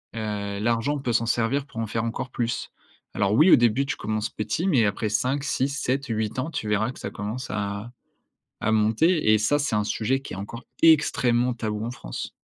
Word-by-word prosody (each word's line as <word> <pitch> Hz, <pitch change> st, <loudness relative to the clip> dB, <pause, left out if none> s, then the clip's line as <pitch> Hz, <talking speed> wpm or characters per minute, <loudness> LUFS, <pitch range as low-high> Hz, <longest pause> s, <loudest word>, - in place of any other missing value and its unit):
heu, 105 Hz, -2 st, -3 dB
l'argent, 115 Hz, +6 st, +1 dB
on -, -, -3 dB
peut 125 Hz, -3 st, -2 dB
s'en 115 Hz, 0 st, +2 dB
servir 120 Hz, +4 st, 0 dB
pour 125 Hz, -5 st, -8 dB
en 115 Hz, -, -2 dB
faire 110 Hz, +1 st, -2 dB
encore 115 Hz, +2 st, -3 dB
plus. 120 Hz, -2 st, -3 dB, 0.4 s
Alors 100 Hz, 0 st, +1 dB
oui, 155 Hz, -, +6 dB
au -, -, +11 dB
début 120 Hz, +3 st, +3 dB
tu -, -, -2 dB
commences 110 Hz, 0 st, -2 dB
petit, 110 Hz, -, -2 dB
mais 130 Hz, -, +4 dB
après 105 Hz, +2 st, -1 dB
5, 130 Hz, +6 st, 0 dB
6, 140 Hz, -1 st, 0 dB
7, 140 Hz, -1 st, -1 dB
8 110 Hz, 0 st, -2 dB
ans, 135 Hz, +5 st, -2 dB
tu 115 Hz, -, -4 dB
verras 105 Hz, +3 st, +1 dB
que -, -, -13 dB
ça -, -, -4 dB
commence 110 Hz, +5 st, -5 dB
à 100 Hz, +2 st, -3 dB, 0.7 s
à 110 Hz, -, +2 dB
monter. 110 Hz, +6 st, +3 dB
Et 110 Hz, -, +5 dB
ça, 130 Hz, +8 st, +2 dB
c'est 145 Hz, -6 st, -1 dB
un 105 Hz, -, +2 dB
sujet 120 Hz, +5 st, 0 dB
qui 135 Hz, -, -8 dB
est -, -, -7 dB
encore 105 Hz, +5 st, -7 dB, 0.2 s
extrêmement 125 Hz, -6 st, +4 dB
tabou, 110 Hz, -2 st, -3 dB
en 120 Hz, -, -3 dB
France. -, -, -6 dB
115 Hz, 215 wpm, -25 LUFS, 105-135 Hz, 0.7 s, au